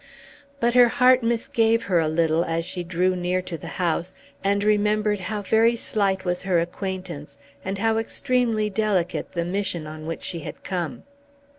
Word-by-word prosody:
But 235 0 +2
her 245 -1 +7
heart 255 +2 +4
misgave 230 -1 +1
her 180 -5 +2
a 160 - +1
little 160 +1 +2
as 165 -1 -2
she 180 0 -4
drew 180 +2 +1
near 180 +1 0
to 180 - -5
the 155 - -8
house, 175 0 -2 0.3
and 200 +1 +1
remembered 210 0 +2
how 205 +2 -4
very 225 +4 +3
slight 195 -4 0
was 180 0 -1
her 180 -3 +2
acquaintance 175 -3 -5 0.3
and 195 +1 -3
how 225 +2 +1
extremely 225 -1 0
delicate 205 -4 -1
the 170 -2 -1
mission 180 -3 -2
on 155 0 -8
which 165 - -5
she 175 -3 -2
had 150 - -9
come. 175 -4 -4
190 Hz, 170 wpm, -24 LUFS, 175-215 Hz, 0.3 s, her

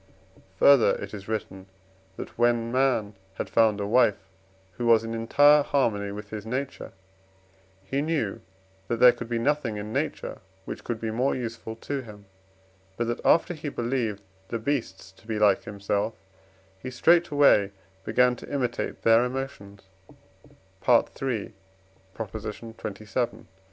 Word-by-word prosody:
Further, 140 +3 +6
it - - -7
is 100 -2 -8
written 100 -3 -5 0.5
that - - -8
when 120 -1 +2
man 125 -5 +1 0.2
had - - -5
found 110 -3 +3
a 100 - -2
wife, 105 -4 +2 0.4
who 120 +6 -3
was 115 -1 +5
in 115 0 -5
entire 145 +6 +5
harmony 110 -9 0
with 105 0 -8
his 105 -1 -5
nature, 130 +5 -5 0.9
he 135 +8 -2
knew 150 -10 -1 0.5
that 115 - -1
there 125 0 +9
could 120 -1 -8
be 120 - 0
nothing 130 -3 0
in 105 +1 -6
nature - - -3 0.3
which - - -7
could 120 -2 -3
be 110 -1 -3
more 125 +5 +1
useful 115 -2 -5
to 140 +4 -4
him; 105 -4 -13 0.7
but 120 - 0
that 120 0 -3
after 175 +2 +4
he 155 -2 -5
believed 120 -5 -2 0.2
the 115 - -3
beasts 110 -6 -3
to 95 - -23
be 110 -1 -2
like 105 -2 +3
himself, 100 +2 -2 0.6
he 130 - -6
straightway 145 - +4 0.3
began 125 +3 +3
to - - -11
imitate 125 -4 -2
their 115 +1 +5
emotions 125 -6 -5 1.4
(III. 125 -6 -1
xxvii.) - - -16
115 Hz, 140 wpm, -26 LUFS, 105-130 Hz, 1.4 s, there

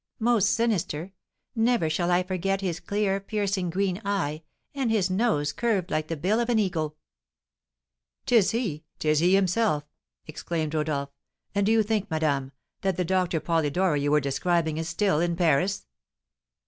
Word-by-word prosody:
"Most 225 -4 +3
sinister. 195 -6 -1 0.4
Never 230 -6 +2
shall 170 +3 0
I 180 +1 +3
forget 190 +1 -1
his 175 -3 -2
clear, 200 -1 0
piercing, 195 -2 -2
green 190 +2 -1
eye, 170 -7 -1 0.3
and 270 -4 -1
his 200 -4 +1
nose 185 -8 +1
curved 210 -7 -1
like 155 0 -1
the 165 - -3
bill 195 +9 +1
of 240 0 -1
an 235 - +3
eagle." 160 -7 -1 1.3
"'Tis 230 -6 +4
he, 205 -10 -2
'tis 155 -1 +2
he 180 +4 +4
himself!" 195 -4 +2 0.4
exclaimed 155 0 -4
Rodolph. 150 -3 -1 0.4
"And 200 0 +1
do - - +3
you 225 -1 +4
think, 210 -1 -1
madame, 145 -4 0 0.3
that 190 -3 0
the 180 - 0
Doctor 180 -2 +1
Polidori 160 0 +1
you 145 - 0
were 150 +1 +4
describing 160 +3 0
is 165 +1 -3
still 195 -6 +1
in 170 0 0
Paris?" 180 +3 +1
180 Hz, 160 wpm, -26 LUFS, 155-205 Hz, 1.3 s, Tis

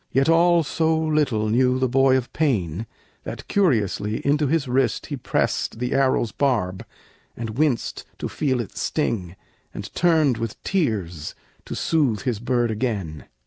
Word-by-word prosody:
Yet 135 +4 +2
all 170 0 +5
so 160 +2 +1
little 150 -9 +1
knew 125 +3 +3
the 130 0 +1
boy 135 +1 +4
of 125 -2 -5
pain, 110 - 0 0.4
That - - -7
curiously 110 - +1
into 145 +1 +2
his 150 -1 +1
wrist 125 -2 +1
he 145 - -4
pressed 125 - -1
The 125 +1 -2
arrow's 130 -4 +2
barb, 105 -10 0 0.5
and 115 -1 -4
winced 145 -7 0
to - - -4
feel 130 -4 -1
it 100 - -9
sting, 95 - -2 0.4
And - - -7
turned 155 -8 +3
with 115 -2 -4
tears 100 - -1 0.3
to - - -5
soothe 135 -11 +1
his 115 -2 -2
bird 120 -1 0
again. 105 - -3
125 Hz, 150 wpm, -23 LUFS, 110-150 Hz, 0.5 s, all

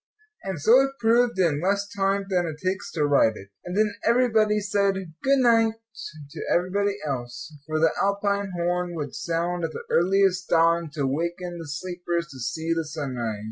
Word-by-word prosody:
And 190 -5 -4
so 230 - +6
it 270 0 -1
proved 235 0 +3
in 165 -6 +2
less 200 +2 0
time 195 0 0
than 180 -3 0
it 155 -2 -5
takes 190 +1 -2
to 150 -4 +1
write 140 -6 +3
it. 100 - -12
And 180 +2 -5
then 215 -1 +2
everybody 225 -3 +3
said 200 -1 +1 0.3
"good 275 +1 +3
night" 230 -3 +4 0.6
to - - -7
everybody 195 +3 +1
else; 125 +1 -5
for 155 0 -1
the 160 0 +4
Alpine 200 0 0
horn 175 0 -1
would 145 -4 -5
sound 170 +1 -2
at 160 -1 -2
the - - -6
earliest 185 +1 +2
dawn 165 0 +3
to 145 -4 -1
waken 170 +5 -3
the 165 - -8
sleepers 175 +2 -3
to 135 - -11
see 160 +7 -2
the 165 -1 -2
sunrise. 130 -8 -4
175 Hz, 180 wpm, -25 LUFS, 160-200 Hz, 0.6 s, so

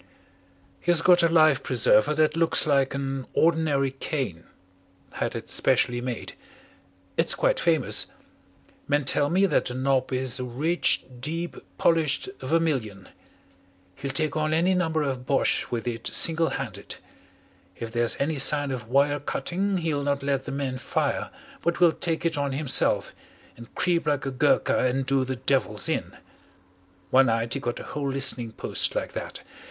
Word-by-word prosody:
"He - - -5
has 170 -1 +4
got 180 -1 +6
a 170 - +4
life 155 -4 +4
preserver 130 +3 +3
that 155 0 +2
looks 165 0 +3
like 140 -3 +2
an 135 -1 -4
ordinary 155 -5 +2
cane 130 - -4 0.7
had - - -3
it - - -6
specially 120 0 +1
made. 125 -2 -5 0.8
It's - - +2
quite - - +1
famous. - - +1 0.8
Men 145 0 +1
tell 145 +1 +2
me 190 +3 +3
that 195 - +1
the 125 - -5
knob 130 0 0
is 130 -1 0
a - - -3
rich, 145 +8 0 0.2
deep, 165 +6 -4 0.2
polished 165 - +1
vermilion. 130 - -1 0.8
He'll 140 +7 -6
take 155 +1 -1
on 155 0 0
any 175 +4 +2
number 160 -4 0
of 130 -2 -4
Boches 140 - +1
with 120 -1 -4
it 115 -1 -4
single 165 0 +4
handed. - - -6 0.8
If 115 -1 -7
there's 120 0 +1
any 145 +1 -1
sign 145 +1 +3
of 120 -4 -5
wire 140 +3 +2
cutting, 185 +8 -2
he'll 160 -4 -1
not 140 -1 -1
let 140 -1 -1
the - - -5
men 135 -2 -3
fire, - - -2 0.3
but 170 0 -1
will 175 -2 +6
take 165 0 -2
it 165 -3 0
on 140 -1 -1
himself, 140 0 +1 0.4
and 115 0 -14
creep 170 -3 0
like 145 -2 0
a 135 - -2
Gurkha 140 +3 +2
and 130 +1 0
do 135 0 +1
the 130 +1 -3
devils - - 0
in. - - -3 0.9
One 130 0 +5
night 115 0 0
he 140 - -2
got 120 -3 -4
a - - -7
whole 145 -2 -4
listening 130 -4 -1
post - - -1
like - - -3
that. - - -6
140 Hz, 165 wpm, -25 LUFS, 130-160 Hz, 0.9 s, got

